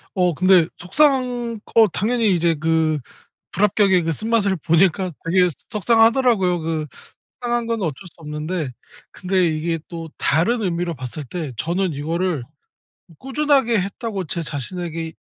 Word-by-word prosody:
어 180 -2 +2
근데 185 0 +4
속상한 245 - +1
거 225 -2 +4
당연히 220 +2 +1
이제 170 0 +2
그 160 -1 +1 0.5
불합격의 195 -2 +3
그 165 - 0
쓴맛을 215 +1 +1
보니까 175 +3 +2
되게 180 +2 +3
소 - - -5 0.2
속상하더라고요. 225 -4 +3
그 160 -1 -2 0.5
속상한 240 -1 -1
건 230 -1 -1
어쩔 160 -6 -1
수 170 - -13
없는데. 150 0 -4 0.4
근데 185 -1 +1
이게 165 +1 -1
또 165 -2 -7
다른 195 - +1
의미로 175 -3 -1
봤을 130 +2 -6
때 155 0 -5
저는 175 - -1
이거를 165 +1 -2 0.8
'꾸준하게 270 -4 +2
했다.'고 200 0 -4
제 165 +2 -3
자신에게 165 +3 -5
180 Hz, 295 characters per minute, -21 LUFS, 165-220 Hz, 0.8 s, 근데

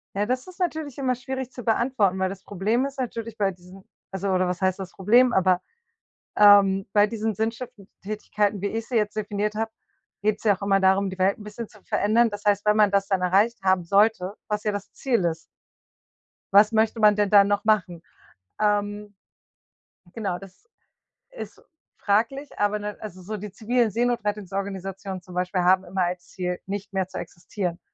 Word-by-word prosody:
Ja, 205 +1 +1
das 255 - -2
ist 370 0 -13
natürlich 315 -6 -2
immer 260 -2 0
schwierig 260 0 -5
zu 245 - -9
beantworten, 225 -4 +1
weil 190 0 +1
das 195 0 -9
Problem 215 +6 0
ist 275 0 -6
natürlich 230 -3 -4
bei 200 -2 +1
diesen 180 +1 -15 0.3
also 195 +1 -3
oder 185 -1 +2
was 180 0 -3
heißt 190 0 +1
das 185 -2 -6
Problem, 240 +6 +4
aber, 185 -2 +3 0.7
ähm, 200 -2 +6
bei 205 0 +4
diesen 220 0 -2
sinnstiftenden 220 -1 -5
Tätigkeiten, 210 0 -1
wie 200 - 0
ich 225 +2 -4
sie 250 - -4
jetzt 210 -1 0
definiert 210 0 -2
habe, 225 +1 -2 0.5
geht's 210 0 0
ja 205 -3 +3
auch - - -29
immer 200 0 +2
darum, 190 +1 +3
die 190 - -8
Welt 190 +1 +2
'n 210 - -11
bisschen 210 +2 -7
zu 210 - -19
verändern. 225 +3 +2
Das 205 -1 -8
heißt, 205 0 +2
wenn 210 0 +4
man 210 -2 +4
das 200 0 +1
dann 190 -2 0
erreicht 200 +6 +2
haben 185 -1 +2
sollte, 200 0 +2 0.2
was 210 0 -2
ja 210 - +1
das 205 -1 -6
Ziel 240 -8 0
ist. 165 -1 -2 1.1
Was 210 +2 +7
möchte 220 +1 +1
man 210 -1 +6
denn 205 -1 +1
da 200 -1 +7
noch 205 0 0
machen? 190 -6 +1 0.6
Ähm 205 0 0 1.0
genau, 200 -6 -2
das 195 - -15 0.6
ist - - -9 0.4
fraglich, 235 +8 0
aber 205 +1 +1
ne 210 0 -5
also 185 -4 -8
so 210 +4 -5
die 205 0 -7
zivilen 225 +3 0
Seenotrettungsorganisationen 200 -4 -3
zum 180 0 -13
Beispiel 180 +1 0
haben 185 +1 +4
immer 185 +1 -1
als 175 0 -4
Ziel, 180 -1 -3
nicht 200 +1 -6
mehr 190 -1 0
zu - - -8
existieren. 175 0 -5
205 Hz, 185 wpm, -25 LUFS, 190-220 Hz, 1.1 s, Was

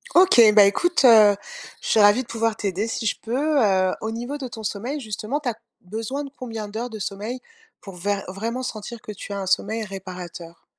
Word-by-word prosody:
OK, 365 -8 +6 0.2
bah, 210 - +9
écoute, 310 - +2
heu, 215 -4 +8 0.5
je - - -5
suis 220 - +4
ravie 205 +4 +6
de 245 - -10
pouvoir 225 -1 -1
t'aider 200 +1 -2
si 225 - -4
je 210 - 0
peux. 280 +6 0
Heu, 190 -3 +3
au 220 - -4
niveau 240 +5 -4
de 270 -3 -5
ton 220 -2 -9
sommeil, 240 +9 -3
justement 220 +5 -4
tu 260 - -1
as 230 - -4 0.3
besoin 225 +9 -4
de 275 - -9
combien 225 -4 -6
d'heures 225 +4 -4
de 220 -2 -8
sommeil, 210 +6 -5 0.4
pour 195 -2 -10
vair 200 +2 -1
vraiment 230 +7 -4
sentir 225 0 -6
que - - -8
tu 205 0 -8
as 200 - -3
un - - -4
sommeil 215 +4 0
réparateur? 180 -4 -9
220 Hz, 210 wpm, -23 LUFS, 200-245 Hz, 0.5 s, bah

